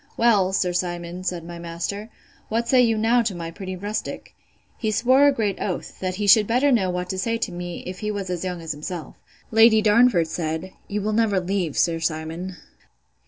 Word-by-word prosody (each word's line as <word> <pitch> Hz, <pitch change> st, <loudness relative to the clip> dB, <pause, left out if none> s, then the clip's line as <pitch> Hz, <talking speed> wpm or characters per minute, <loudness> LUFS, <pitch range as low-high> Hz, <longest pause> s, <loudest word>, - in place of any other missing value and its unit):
Well, 210 Hz, -5 st, +4 dB
Sir 185 Hz, -2 st, 0 dB
Simon, 175 Hz, 0 st, -3 dB
said 175 Hz, -2 st, -3 dB
my 170 Hz, 0 st, -8 dB
master, 170 Hz, +6 st, -5 dB, 0.4 s
what 230 Hz, +2 st, -1 dB
say 260 Hz, -2 st, +5 dB
you 225 Hz, -2 st, +3 dB
now 230 Hz, +3 st, +3 dB
to 215 Hz, -5 st, -2 dB
my 165 Hz, -1 st, -5 dB
pretty 185 Hz, +2 st, -6 dB
rustic?—He 210 Hz, +2 st, -6 dB
swore 255 Hz, +6 st, +4 dB
a -, -, +6 dB
great 215 Hz, -7 st, -2 dB
oath, 185 Hz, -, -4 dB
that 185 Hz, -1 st, -2 dB
he 205 Hz, +2 st, -2 dB
should 210 Hz, +1 st, +6 dB
better 255 Hz, +5 st, +3 dB
know 200 Hz, -7 st, +2 dB
what 180 Hz, 0 st, -2 dB
to 190 Hz, -, -4 dB
say 230 Hz, +4 st, 0 dB
to 230 Hz, -, -3 dB
me 175 Hz, 0 st, -6 dB
if 185 Hz, +1 st, -6 dB
he 210 Hz, -, -3 dB
was 200 Hz, -3 st, -3 dB
as 175 Hz, -1 st, -3 dB
young 180 Hz, -2 st, -4 dB
as 160 Hz, -, -4 dB
himself. 155 Hz, +2 st, -6 dB, 0.4 s
Lady 225 Hz, 0 st, +6 dB
Darnford 215 Hz, -4 st, +4 dB
said, 160 Hz, +3 st, -4 dB
You 205 Hz, 0 st, -3 dB
will 215 Hz, +1 st, -1 dB
never 210 Hz, -3 st, +2 dB
leave, 180 Hz, -4 st, -2 dB
Sir 165 Hz, -1 st, +2 dB
Simon. 165 Hz, +3 st, -3 dB
190 Hz, 200 wpm, -23 LUFS, 175-220 Hz, 0.4 s, a